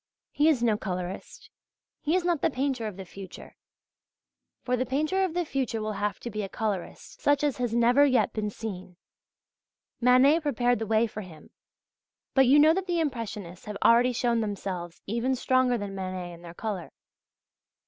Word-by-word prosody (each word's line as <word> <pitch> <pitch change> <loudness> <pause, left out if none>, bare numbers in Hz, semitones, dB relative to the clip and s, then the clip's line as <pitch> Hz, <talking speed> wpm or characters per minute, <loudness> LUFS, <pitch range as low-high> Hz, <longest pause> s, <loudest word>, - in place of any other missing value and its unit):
He 300 +2 +3
is 265 -7 +2
no 215 -3 +2
colourist. 180 -1 -6 0.5
He 315 +3 +1
is 365 -1 +1
not 345 -5 +1
the - - +3
painter 260 -4 -1
of 205 -3 -7
the 190 - -7
future. 190 +1 -11 1.1
For 250 - +1
the 250 - 0
painter 305 +9 0
of 355 -3 -2
the 355 -1 0
future 260 -6 -2
will 215 0 -2
have 205 -2 -1
to 235 - -5
be 215 0 -3
a 195 - -4
colourist 205 -5 -4
such 290 0 +2
as 290 -3 +1
has 240 -2 -1
never 240 +4 +5
yet 260 -4 +3
been 210 -1 -2
seen. 190 -4 -7 1.0
Manet 255 +6 +5
prepared 245 -6 +1
the 225 - -3
way 220 +1 +3
for 215 -1 -6
him; 165 -6 -13 0.8
but 265 -2 +5
you 275 +4 +6
know 310 +2 +7
that 380 +2 -2
the 345 -1 0
Impressionists 215 - -4
have 210 -1 -5
already 240 +2 +5
shown 235 -1 +1
themselves 185 -5 -5
even 235 +5 0
stronger 255 -1 +2
than 205 -2 -5
Manet 185 -2 -5
in 170 - -13
their 170 0 -11
colour. 200 -6 -4
235 Hz, 180 wpm, -27 LUFS, 200-270 Hz, 1.1 s, know